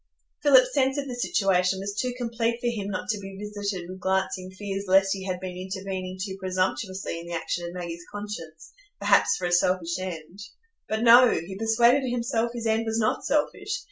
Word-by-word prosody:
Philip's 260 Hz, -3 st, +6 dB
sense 270 Hz, 0 st, +2 dB
of 280 Hz, -1 st, -2 dB
the 255 Hz, -, -4 dB
situation 190 Hz, -6 st, +1 dB
was 200 Hz, +1 st, -4 dB
too 250 Hz, +5 st, -1 dB
complete 235 Hz, -1 st, -1 dB
for 245 Hz, -, -7 dB
him 225 Hz, -5 st, -1 dB
not 185 Hz, -2 st, -4 dB
to 215 Hz, -1 st, 0 dB
be 195 Hz, -1 st, -9 dB
visited 205 Hz, -3 st, -4 dB
with 185 Hz, +1 st, -8 dB
glancing 190 Hz, 0 st, -1 dB
fears 195 Hz, +1 st, -5 dB
lest 195 Hz, +1 st, +5 dB
he 190 Hz, -1 st, -6 dB
had 180 Hz, -1 st, -2 dB
been 185 Hz, -1 st, -6 dB
intervening 190 Hz, 0 st, -5 dB
too 190 Hz, 0 st, -4 dB
presumptuously 185 Hz, -1 st, -2 dB
in 170 Hz, -, -9 dB
the 170 Hz, -, -6 dB
action 170 Hz, +1 st, -3 dB
of 170 Hz, -, -7 dB
Maggie's 170 Hz, -1 st, -6 dB
conscience, 185 Hz, -7 st, -8 dB, 0.2 s
perhaps -, -, +4 dB
for 180 Hz, -, -3 dB
a 175 Hz, -, -1 dB
selfish 175 Hz, -1 st, +1 dB
end. 180 Hz, 0 st, -7 dB, 0.5 s
But 220 Hz, +1 st, -1 dB
no!—he 230 Hz, -7 st, +6 dB
persuaded 235 Hz, +5 st, +3 dB
himself 235 Hz, -1 st, 0 dB
his 235 Hz, -1 st, -6 dB
end 225 Hz, +1 st, +1 dB
was 225 Hz, 0 st, 0 dB
not 215 Hz, -1 st, +1 dB
selfish. 405 Hz, -, 0 dB
195 Hz, 190 wpm, -26 LUFS, 185-230 Hz, 0.5 s, Philip's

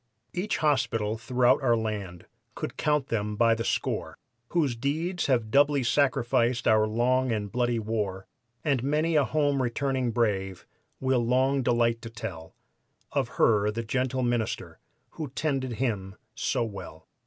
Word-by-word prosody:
'" -, -, -51 dB
Each 195 Hz, +4 st, -1 dB
hospital 120 Hz, -8 st, +1 dB
throughout 125 Hz, +1 st, +3 dB
our 120 Hz, -3 st, +3 dB
land 100 Hz, -6 st, -4 dB, 0.3 s
could -, -, -5 dB
count 150 Hz, -2 st, 0 dB
them 105 Hz, -2 st, -1 dB
by 115 Hz, +1 st, +4 dB
the 115 Hz, 0 st, -2 dB
score -, -, -2 dB, 0.3 s
Whose 150 Hz, -8 st, +1 dB
deeds 160 Hz, +8 st, -1 dB
have 120 Hz, -5 st, +1 dB
doubly 145 Hz, 0 st, +4 dB
sanctified 125 Hz, -2 st, +2 dB
our 110 Hz, -1 st, +4 dB
long 125 Hz, +3 st, +1 dB
and 105 Hz, -3 st, -2 dB
bloody 120 Hz, -1 st, +1 dB
war, 105 Hz, -4 st, -2 dB, 0.4 s
And 140 Hz, -5 st, +1 dB
many 155 Hz, +5 st, +1 dB
a 150 Hz, -, +5 dB
home 145 Hz, -2 st, +1 dB
returning 130 Hz, +1 st, 0 dB
brave 100 Hz, -5 st, -1 dB, 0.3 s
will 130 Hz, -2 st, +1 dB
long 130 Hz, +3 st, +2 dB
delight 120 Hz, -1 st, +2 dB
to 115 Hz, -, -7 dB
tell 100 Hz, -8 st, -7 dB, 0.6 s
Of -, -, 0 dB
her, 105 Hz, -2 st, +4 dB
the 115 Hz, +2 st, -3 dB
gentle 130 Hz, +3 st, -1 dB
minister, 120 Hz, -2 st, -2 dB, 0.3 s
who 155 Hz, -3 st, -6 dB
tended 135 Hz, -5 st, -1 dB
him 100 Hz, -6 st, -2 dB, 0.2 s
so 125 Hz, -3 st, 0 dB
well. 95 Hz, -7 st, -8 dB
120 Hz, 150 wpm, -27 LUFS, 110-135 Hz, 0.6 s, a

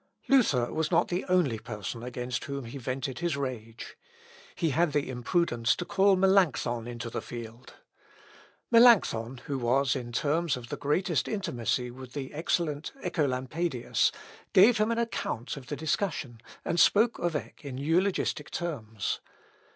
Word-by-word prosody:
] -, -, -34 dB
Luther 145 Hz, -, +3 dB
was 160 Hz, -1 st, 0 dB
not 170 Hz, -1 st, +2 dB
the 180 Hz, +1 st, -2 dB
only 165 Hz, -12 st, +2 dB
person 105 Hz, +1 st, -6 dB
against 125 Hz, 0 st, -4 dB
whom 140 Hz, -2 st, -5 dB
he 120 Hz, +4 st, -7 dB
vented 130 Hz, 0 st, -3 dB
his 170 Hz, -4 st, -1 dB
rage. 120 Hz, -5 st, -6 dB, 0.6 s
He 165 Hz, -4 st, 0 dB
had 160 Hz, +2 st, +2 dB
the 145 Hz, -1 st, +1 dB
imprudence 120 Hz, -2 st, +1 dB
to 175 Hz, -, -4 dB
call 195 Hz, +1 st, +4 dB
Melancthon 185 Hz, -, +2 dB
into 120 Hz, -1 st, -6 dB
the -, -, -3 dB
field. 115 Hz, 0 st, -9 dB, 1.0 s
Melancthon, 170 Hz, -, +5 dB
who 140 Hz, -2 st, -2 dB
was 130 Hz, +3 st, +2 dB
in 120 Hz, -3 st, -5 dB
terms 150 Hz, +4 st, 0 dB
of 120 Hz, -1 st, -10 dB
the -, -, -3 dB
greatest 150 Hz, -1 st, 0 dB
intimacy 125 Hz, -, -2 dB
with 130 Hz, 0 st, -11 dB
the 135 Hz, -2 st, -5 dB
excellent 155 Hz, -1 st, -1 dB
Œcolampadius, 145 Hz, -3 st, 0 dB, 0.4 s
gave 215 Hz, +4 st, +7 dB
him 215 Hz, +1 st, +2 dB
an 230 Hz, -, 0 dB
account 225 Hz, -, -2 dB
of 135 Hz, -3 st, -10 dB
the 145 Hz, -, -3 dB
discussion, 145 Hz, -, -2 dB, 0.2 s
and 170 Hz, -, 0 dB
spoke 220 Hz, +6 st, +4 dB
of 175 Hz, -2 st, -1 dB
Eck 150 Hz, -, -6 dB
in 135 Hz, -3 st, -6 dB
eulogistic 165 Hz, +1 st, 0 dB
terms. 115 Hz, -, -3 dB
140 Hz, 150 wpm, -29 LUFS, 120-175 Hz, 1.0 s, gave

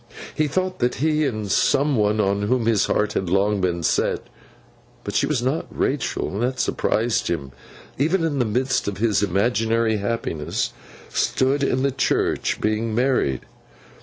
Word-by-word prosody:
He 155 Hz, -, +1 dB
thought 185 Hz, +4 st, -2 dB
that 125 Hz, +1 st, +1 dB
he, 155 Hz, +1 st, +1 dB
and 110 Hz, -5 st, -3 dB
some 140 Hz, +1 st, +3 dB
one 105 Hz, -1 st, +2 dB
on 100 Hz, 0 st, +1 dB
whom 115 Hz, +3 st, +1 dB
his 110 Hz, -3 st, +2 dB
heart 105 Hz, 0 st, +1 dB
had 95 Hz, -, -1 dB
long 100 Hz, +2 st, +2 dB
been 85 Hz, -2 st, -1 dB
set—but -, -, -4 dB
she -, -, +2 dB
was 135 Hz, -6 st, 0 dB
not 135 Hz, +5 st, -1 dB
Rachael, -, -, -1 dB
and 100 Hz, -, -4 dB
that 130 Hz, +1 st, -1 dB
surprised 115 Hz, +1 st, 0 dB
him, 70 Hz, -6 st, -3 dB, 0.5 s
even 165 Hz, +5 st, +2 dB
in 150 Hz, -4 st, 0 dB
the 125 Hz, -, +2 dB
midst 125 Hz, +3 st, 0 dB
of 100 Hz, -, -3 dB
his 110 Hz, -1 st, +2 dB
imaginary 110 Hz, +3 st, +1 dB
happiness—stood 115 Hz, -, -2 dB
in 130 Hz, -1 st, +1 dB
the 140 Hz, -, +2 dB
church 135 Hz, 0 st, 0 dB
being 110 Hz, +1 st, -1 dB
married. 125 Hz, -, +1 dB
115 Hz, 155 wpm, -22 LUFS, 105-135 Hz, 0.5 s, some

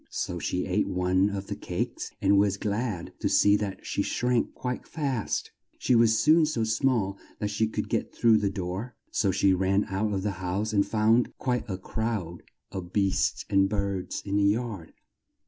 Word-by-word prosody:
So -, -, -3 dB
she 90 Hz, -, -2 dB
ate 95 Hz, +2 st, 0 dB
one 90 Hz, +2 st, +2 dB
of 100 Hz, -1 st, -4 dB
the -, -, -4 dB
cakes -, -, -4 dB
and 100 Hz, 0 st, +5 dB
was 100 Hz, -1 st, +2 dB
glad 105 Hz, -3 st, -3 dB
to -, -, 0 dB
see 100 Hz, 0 st, +5 dB
that 100 Hz, -2 st, -5 dB
she -, -, -1 dB
shrank 125 Hz, -1 st, 0 dB
quite 125 Hz, -1 st, -4 dB
fast. 135 Hz, -8 st, -2 dB, 0.3 s
She -, -, +1 dB
was 115 Hz, -1 st, +5 dB
soon 155 Hz, +3 st, +5 dB
so 125 Hz, -7 st, -1 dB
small 110 Hz, -3 st, +1 dB, 0.2 s
that 105 Hz, -1 st, -2 dB
she 110 Hz, +1 st, +1 dB
could 110 Hz, -, -3 dB
get -, -, -1 dB
through 115 Hz, -2 st, +4 dB
the 100 Hz, -1 st, +1 dB
door, 95 Hz, +5 st, -5 dB, 0.2 s
so 100 Hz, -, +1 dB
she 95 Hz, 0 st, +3 dB
ran 95 Hz, +2 st, +2 dB
out 105 Hz, +3 st, 0 dB
of 95 Hz, -2 st, -2 dB
the 105 Hz, -, 0 dB
house 100 Hz, +4 st, -2 dB
and 100 Hz, -1 st, +4 dB
found 110 Hz, +3 st, +2 dB
quite 125 Hz, -2 st, -1 dB
a 95 Hz, -, -2 dB
crowd 95 Hz, -4 st, -3 dB, 0.3 s
of 90 Hz, -2 st, -6 dB
beasts 100 Hz, -2 st, +1 dB
and 95 Hz, 0 st, +3 dB
birds 100 Hz, -2 st, -2 dB
in 100 Hz, 0 st, 0 dB
the 100 Hz, -, +3 dB
yard. 105 Hz, -4 st, -1 dB
100 Hz, 185 wpm, -27 LUFS, 95-115 Hz, 0.3 s, and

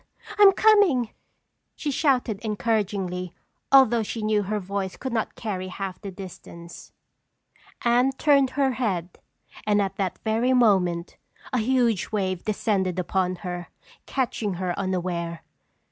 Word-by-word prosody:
I'm 405 Hz, -1 st, +9 dB
coming!" 380 Hz, -, +4 dB, 0.6 s
she 295 Hz, -, -3 dB
shouted 255 Hz, -7 st, +1 dB
encouragingly 200 Hz, -5 st, -2 dB, 0.4 s
although 260 Hz, -4 st, +6 dB
she 220 Hz, +1 st, -4 dB
knew 215 Hz, -1 st, +2 dB
her 210 Hz, +2 st, -2 dB
voice 195 Hz, 0 st, -4 dB
could 260 Hz, -2 st, -5 dB
not 225 Hz, -2 st, -2 dB
carry 190 Hz, -4 st, -4 dB
half 190 Hz, 0 st, -6 dB
the 200 Hz, -, -6 dB
distance. 175 Hz, -2 st, -11 dB, 0.9 s
Anne 245 Hz, +2 st, +3 dB
turned 275 Hz, -1 st, +3 dB
her 275 Hz, -2 st, +3 dB
head 190 Hz, -9 st, -3 dB, 0.4 s
and 210 Hz, -1 st, +2 dB
at 195 Hz, -2 st, -1 dB
that 190 Hz, -3 st, -2 dB
very 230 Hz, +4 st, +1 dB
moment 185 Hz, -8 st, +2 dB, 0.4 s
a 250 Hz, -, +2 dB
huge 235 Hz, -4 st, +1 dB
wave 190 Hz, -4 st, -1 dB
descended 195 Hz, -4 st, 0 dB
upon 185 Hz, 0 st, 0 dB
her, 175 Hz, -1 st, -4 dB, 0.4 s
catching 230 Hz, -7 st, -1 dB
her 180 Hz, 0 st, -2 dB
unaware. 175 Hz, -3 st, -3 dB
210 Hz, 130 wpm, -25 LUFS, 185-245 Hz, 0.9 s, I'm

